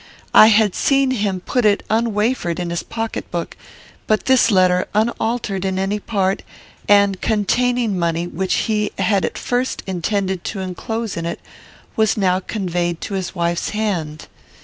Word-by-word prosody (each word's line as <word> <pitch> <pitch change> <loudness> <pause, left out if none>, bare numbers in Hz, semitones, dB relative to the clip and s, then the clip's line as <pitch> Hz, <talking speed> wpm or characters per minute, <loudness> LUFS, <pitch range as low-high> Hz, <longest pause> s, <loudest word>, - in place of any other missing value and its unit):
I 215 - +9
had 215 -3 +4
seen 275 -2 +2
him 200 -6 -1
put 250 +6 -1
it 205 -1 +2
unwafered 220 -5 0
in 175 -1 -3
his 170 - -2
pocket 225 -1 -5
book, 170 -1 -4 0.5
but 215 -1 +1
this 260 -3 +4
letter, 185 -3 +3
unaltered 220 -2 -1
in 190 -1 -1
any 195 +2 -1
part, 195 -2 -1 0.5
and 200 -2 +4
containing 230 0 +1
money 170 0 0
which 180 +2 -2
he 210 -1 0
had 195 0 +1
at - - -4
first 250 +1 -2
intended 190 0 -2
to 205 - -4
enclose 210 +4 -4
in 165 0 -3
it, 170 - -4 0.6
was 220 -1 +2
now 185 -2 +2
conveyed 175 -4 -2
to 200 - -5
his 190 -1 -3
wife's 170 -1 -1
hand. 170 -8 -2
200 Hz, 155 wpm, -19 LUFS, 180-220 Hz, 0.6 s, I